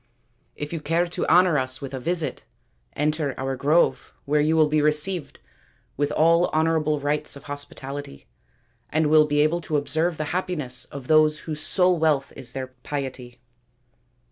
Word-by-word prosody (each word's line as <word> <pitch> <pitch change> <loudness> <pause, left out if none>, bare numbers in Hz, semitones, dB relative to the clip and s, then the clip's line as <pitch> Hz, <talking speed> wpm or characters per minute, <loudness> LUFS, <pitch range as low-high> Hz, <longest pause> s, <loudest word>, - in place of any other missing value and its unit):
If 150 +2 -6
you 165 - -2
care 165 +4 +1
to 175 - -4
honour 175 -2 +5
us 130 0 -3
with 135 -1 -7
a 130 - -4
visit, 165 +3 -1 0.5
enter 150 -2 -1
our 135 0 -2
grove, 150 +6 +1
where 150 +1 +2
you 155 +2 +2
will 155 -1 +5
be 150 0 +1
received 150 +3 0 0.6
with 145 +1 -1
all 165 +2 +4
honourable 155 -1 +1
rites 145 +1 -1
of 140 - -12
hospitality, 145 - -6 0.6
and 155 -1 +1
will 155 -1 +6
be 145 0 +2
able 160 +3 +1
to 155 -2 -1
observe 160 +3 0
the 155 - -2
happiness 150 -9 -1
of 140 -2 -9
those 155 -1 +4
whose 155 -1 -5
sole 180 +1 +2
wealth 150 -4 +1
is 125 -3 -5
their 130 -1 -5
piety." 130 -4 -6
150 Hz, 165 wpm, -24 LUFS, 140-160 Hz, 0.6 s, will